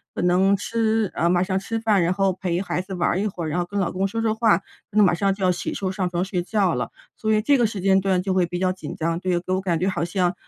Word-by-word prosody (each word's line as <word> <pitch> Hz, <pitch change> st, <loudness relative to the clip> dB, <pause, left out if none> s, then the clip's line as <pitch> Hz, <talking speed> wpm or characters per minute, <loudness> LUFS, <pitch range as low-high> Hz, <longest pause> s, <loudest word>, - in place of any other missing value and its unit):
可 -, -, -2 dB
能 185 Hz, +3 st, +4 dB
吃 220 Hz, 0 st, 0 dB
呃， 170 Hz, -, +1 dB
马 180 Hz, +1 st, +3 dB
上 190 Hz, 0 st, -1 dB
吃 225 Hz, +3 st, -3 dB
饭， 215 Hz, -4 st, +2 dB
然 170 Hz, +1 st, +2 dB
后 195 Hz, 0 st, +1 dB
陪 180 Hz, -1 st, -2 dB
孩 185 Hz, -2 st, -2 dB
子 190 Hz, 0 st, -7 dB
玩 175 Hz, +2 st, +1 dB
一 215 Hz, -, 0 dB
会， 175 Hz, -5 st, -4 dB
然 155 Hz, +3 st, -1 dB
后 175 Hz, -, 0 dB
跟 200 Hz, +3 st, -4 dB
老 180 Hz, -3 st, 0 dB
公 190 Hz, +2 st, 0 dB
说 225 Hz, +3 st, -3 dB
说 220 Hz, -1 st, +2 dB
话， 220 Hz, -5 st, +3 dB
可 195 Hz, +2 st, -11 dB
能 210 Hz, -, +7 dB
马 180 Hz, -, +3 dB
上 195 Hz, +3 st, +1 dB
就 195 Hz, -1 st, -2 dB
要 180 Hz, -, +4 dB
洗 175 Hz, 0 st, -3 dB
漱 190 Hz, -2 st, -2 dB
上 185 Hz, -2 st, -2 dB
床 175 Hz, +1 st, -1 dB
睡 185 Hz, -2 st, -2 dB
觉 190 Hz, -1 st, +1 dB
了。 125 Hz, -1 st, -2 dB, 0.3 s
所 220 Hz, 0 st, -1 dB
以 215 Hz, -, +4 dB
这 280 Hz, +5 st, +3 dB
个 235 Hz, -, +4 dB
时 210 Hz, -2 st, -6 dB
间 190 Hz, +1 st, +3 dB
段 185 Hz, -2 st, +1 dB
就 190 Hz, 0 st, -1 dB
会 185 Hz, -2 st, +2 dB
比 175 Hz, +1 st, -4 dB
较 185 Hz, 0 st, +1 dB
紧 185 Hz, -, -7 dB
张， 165 Hz, +1 st, -1 dB
对 180 Hz, -1 st, 0 dB
给 185 Hz, +1 st, -3 dB
我 185 Hz, -, 0 dB
感 175 Hz, -3 st, 0 dB
觉 185 Hz, -, 0 dB
好 185 Hz, -, -1 dB
像， 180 Hz, 0 st, 0 dB
185 Hz, 325 characters per minute, -23 LUFS, 175-200 Hz, 0.3 s, 能